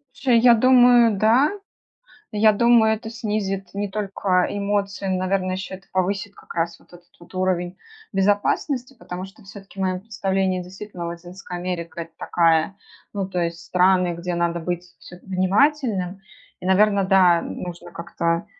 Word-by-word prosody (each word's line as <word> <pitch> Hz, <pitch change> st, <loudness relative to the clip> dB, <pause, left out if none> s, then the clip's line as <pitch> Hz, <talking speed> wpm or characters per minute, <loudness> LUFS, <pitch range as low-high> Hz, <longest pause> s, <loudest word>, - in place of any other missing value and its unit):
Слушай, 245 Hz, -4 st, +3 dB
я 240 Hz, +1 st, +7 dB
думаю, 245 Hz, -2 st, +5 dB
да. 230 Hz, +8 st, +4 dB, 0.9 s
Я 215 Hz, +1 st, +5 dB
думаю, 225 Hz, 0 st, +4 dB
это 220 Hz, +1 st, -8 dB
снизит 210 Hz, -4 st, -3 dB
не 205 Hz, 0 st, -2 dB
только 195 Hz, -2 st, 0 dB
эмоции, 200 Hz, -1 st, -2 dB
но, 185 Hz, -1 st, 0 dB
наверное, 185 Hz, 0 st, -1 dB
еще 190 Hz, 0 st, -6 dB
это 190 Hz, +1 st, -12 dB
повысит 195 Hz, +2 st, -1 dB
как -, -, -13 dB
раз 170 Hz, 0 st, -2 dB
вот -, -, -25 dB
этот 175 Hz, 0 st, -16 dB
вот 170 Hz, -, -16 dB
уровень 185 Hz, -1 st, -1 dB, 0.4 s
безопасности, 210 Hz, +7 st, 0 dB
потому 180 Hz, +1 st, -7 dB
что 195 Hz, +2 st, -14 dB
всё-таки 195 Hz, 0 st, -13 dB
в -, -, -1 dB
моем 185 Hz, -1 st, -1 dB
представлении 190 Hz, -3 st, -1 dB
действительно 180 Hz, -1 st, -8 dB
Латинская 175 Hz, +1 st, -8 dB
Америка- 175 Hz, -2 st, -5 dB
это 165 Hz, -, -12 dB
такая, 165 Hz, +1 st, +2 dB, 0.4 s
ну, 195 Hz, -2 st, -3 dB
то 185 Hz, -, -4 dB
есть 170 Hz, 0 st, -2 dB
страны, 180 Hz, +1 st, +2 dB
где 175 Hz, +1 st, -4 dB
надо 170 Hz, 0 st, 0 dB
быть 175 Hz, +1 st, -3 dB, 0.2 s
вс -, -, -15 dB
внимательным. 195 Hz, -, +1 dB, 0.4 s
И, -, -, -6 dB
наверное, 200 Hz, +1 st, +3 dB
да, 185 Hz, -3 st, +5 dB
нужно 175 Hz, 0 st, -7 dB
как-то, 170 Hz, 0 st, -2 dB
190 Hz, 155 wpm, -22 LUFS, 180-205 Hz, 0.9 s, я